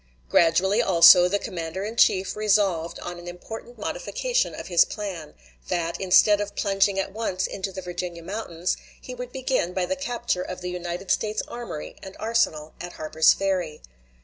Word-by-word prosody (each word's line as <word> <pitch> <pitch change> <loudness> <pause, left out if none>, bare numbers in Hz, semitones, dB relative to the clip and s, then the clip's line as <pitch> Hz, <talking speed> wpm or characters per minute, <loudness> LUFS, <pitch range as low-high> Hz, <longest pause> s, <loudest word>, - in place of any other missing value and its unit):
Gradually, 185 +6 +3
also, 180 -2 +8
the 200 +3 +1
commander 170 -1 -5
in 220 +3 -5
chief 190 -4 +3
resolved 200 -6 +1
on 175 0 -6
an 175 - -11
important 225 +7 -9
modification - - -2
of - - -7
his 175 -2 +5
plan: 185 -8 -7 0.3
that, 170 -1 -2
instead 205 +2 +5
of 205 0 -5
plunging 195 -1 +1
at 195 - -2
once 205 -4 -2
into 195 0 -4
the 190 0 -7
Virginia 175 -1 -5
mountains, 180 -3 -3 0.2
he 255 - -9
would 250 0 -7
begin 255 -9 -1
by 185 -1 0
the 280 - -2
capture 240 -8 -2
of 185 0 -6
the 180 0 -4
United 180 +1 -4
States 215 0 0
armory 235 -11 -7
and 190 0 -10
arsenal 165 -9 0
at 175 0 -7
Harper's 155 0 +3
Ferry. 185 -6 -2
190 Hz, 170 wpm, -25 LUFS, 175-215 Hz, 0.3 s, also